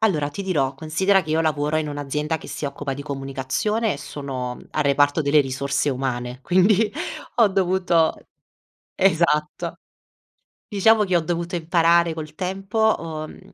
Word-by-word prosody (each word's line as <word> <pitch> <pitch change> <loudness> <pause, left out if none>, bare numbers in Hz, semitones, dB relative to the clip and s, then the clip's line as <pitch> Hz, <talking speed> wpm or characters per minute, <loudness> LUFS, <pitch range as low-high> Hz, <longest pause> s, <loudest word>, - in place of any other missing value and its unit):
Allora 155 -10 +1
ti 200 - -5
dirò, 145 -8 0
considera 180 +6 +2
che 155 - -7
io 160 +1 +2
lavoro 150 -1 0
in 155 -1 0
un'azienda 150 +2 -2
che - - -11
si - - -5
occupa 140 0 -4
di 140 +1 -6
comunicazione 140 - -2
e 140 - -6
sono 135 -3 -5
al 155 - +1
reparto 145 +2 +3
delle 145 +1 +4
risorse 140 +1 -1
umane, 125 -1 -3
quindi 200 +5 +3 0.4
ho 230 - +6
dovuto 185 -3 +2 0.8
esatto. 160 -5 +1 0.9
Diciamo 215 +1 +4
che 185 -3 +1
ho - - +3
dovuto 170 +1 -3
imparare 170 0 +3
col 155 -1 -7
tempo, 195 +5 0
uhm, 155 -2 -7
155 Hz, 145 wpm, -23 LUFS, 140-185 Hz, 0.9 s, ho